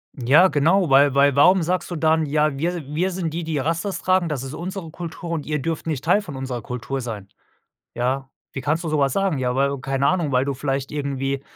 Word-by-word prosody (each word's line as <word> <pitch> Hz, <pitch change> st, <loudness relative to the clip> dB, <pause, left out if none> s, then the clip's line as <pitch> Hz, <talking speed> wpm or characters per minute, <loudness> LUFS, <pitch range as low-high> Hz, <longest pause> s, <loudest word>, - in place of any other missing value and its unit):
Ja, 140 Hz, +9 st, +5 dB
genau, 165 Hz, +2 st, +2 dB
weil 140 Hz, 0 st, +5 dB
weil 140 Hz, -1 st, +4 dB
warum 180 Hz, +5 st, +5 dB
sagst 175 Hz, +1 st, -1 dB
du 175 Hz, -, -4 dB
dann: 160 Hz, 0 st, +2 dB
„Ja, 150 Hz, 0 st, +1 dB
wir 170 Hz, +1 st, -2 dB
wir 160 Hz, +6 st, -1 dB
sind 175 Hz, -4 st, -3 dB
die, 170 Hz, +1 st, -3 dB
die 160 Hz, -1 st, -2 dB
Rastas 165 Hz, +7 st, -1 dB
tragen. 185 Hz, -2 st, +1 dB
Das 135 Hz, -3 st, -3 dB
ist 135 Hz, +2 st, -7 dB
unsere 175 Hz, -1 st, -6 dB
Kultur 170 Hz, 0 st, -7 dB
und 155 Hz, -3 st, -3 dB
ihr 150 Hz, -1 st, -1 dB
dürft 165 Hz, +2 st, -3 dB
nicht 145 Hz, -5 st, -2 dB
Teil 180 Hz, +5 st, +3 dB
von 155 Hz, -9 st, -9 dB
unserer 130 Hz, -3 st, -4 dB
Kultur 125 Hz, +4 st, -4 dB
sein.“ 105 Hz, -5 st, -6 dB, 0.7 s
Ja. 130 Hz, +3 st, -1 dB, 0.2 s
„Wie 135 Hz, -, -4 dB
kannst 155 Hz, +5 st, -1 dB
du -, -, -2 dB
sowas 140 Hz, -3 st, +2 dB
sagen? 195 Hz, -7 st, 0 dB
Ja, 125 Hz, -1 st, -1 dB
weil 140 Hz, +1 st, +1 dB
keine 135 Hz, +2 st, 0 dB
Ahnung, 170 Hz, -6 st, 0 dB
weil 125 Hz, +1 st, +3 dB
du 140 Hz, -, -1 dB
vielleicht 135 Hz, 0 st, -3 dB
irgendwie, 140 Hz, -1 st, -2 dB
150 Hz, 225 wpm, -22 LUFS, 135-170 Hz, 0.7 s, Ja